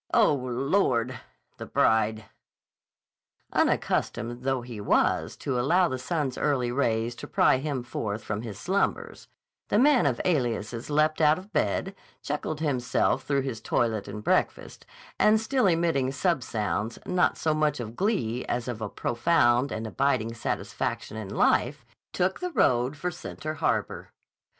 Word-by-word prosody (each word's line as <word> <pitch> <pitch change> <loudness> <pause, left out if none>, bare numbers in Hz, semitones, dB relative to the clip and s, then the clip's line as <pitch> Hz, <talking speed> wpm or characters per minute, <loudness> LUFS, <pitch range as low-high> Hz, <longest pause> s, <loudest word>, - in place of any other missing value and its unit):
Oh, 225 -9 +5
Lord! 130 -1 0 0.4
The - - -7
bride." 110 0 +2 1.3
Unaccustomed 120 +2 0
though 130 -1 -1
he 120 -4 -7
was - - +1
to 130 -3 -2
allow 175 +8 +3
the 130 - -3
sun's 140 0 -2
early 125 -5 +1
rays 115 -3 0
to - - -8
pry - - +3
him 135 -2 -3
forth 110 -3 -4
from 105 0 -3
his 110 -4 -7
slumbers, 190 - -2 0.4
the - - +1
man 260 - +5
of 125 -4 0
aliases 120 - -1
leapt 155 +2 +2
out 150 0 +5
of 190 +3 -12
bed, 195 - 0 0.3
chuckled 150 +1 -3
himself 130 -5 0
through 140 -1 +1
his 125 -5 -4
toilet 110 -3 0
and 105 +1 -7
breakfast, - - -1 0.3
and 215 +1 +5
still 235 0 +1
emitting 165 -7 +1
sub 165 +2 0
sounds, 110 0 -2
not 180 -1 +1
so 155 - +1
much 155 -2 +1
of 115 -1 -6
glee 125 - 0
as 120 0 -2
of 120 -3 -4
a 110 - -3
profound 120 0 +2
and 110 - -4
abiding 115 -1 0
satisfaction 110 -1 -3
in 110 -3 -6
life, - - +1 0.3
took 185 +1 0
the 360 - -2
road 130 - +2
for 180 +4 -2
Center 155 -2 -6
Harbor. - - -2
130 Hz, 150 wpm, -27 LUFS, 115-155 Hz, 1.3 s, Oh